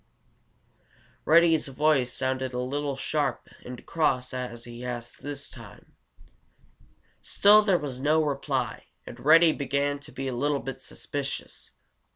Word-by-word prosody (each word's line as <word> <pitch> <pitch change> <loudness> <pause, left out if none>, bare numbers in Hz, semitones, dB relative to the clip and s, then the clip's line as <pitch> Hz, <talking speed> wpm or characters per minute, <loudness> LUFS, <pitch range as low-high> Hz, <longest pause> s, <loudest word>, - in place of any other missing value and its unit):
Reddy's 165 -1 +5
voice 135 -2 +2
sounded 130 0 -2
a 125 - -2
little 140 +2 -2
sharp 145 0 -2 0.2
and 125 0 -9
cross 130 -7 0
as 125 -2 -5
he 120 0 -9
asked 120 -1 -6
this 145 0 -5
time. - - -14 1.3
Still 210 +1 +5
there 200 -4 +3
was 140 -5 -5
no 155 +2 +3
reply, 140 -3 -2 0.2
and 120 - -10
Reddy 165 +3 +7
began 140 0 -1
to 145 +1 -11
be 135 -1 -5
a 130 - -2
little 145 +4 0
bit 135 -1 -6
suspicious. 140 -1 -5
140 Hz, 135 wpm, -27 LUFS, 125-150 Hz, 1.3 s, Reddy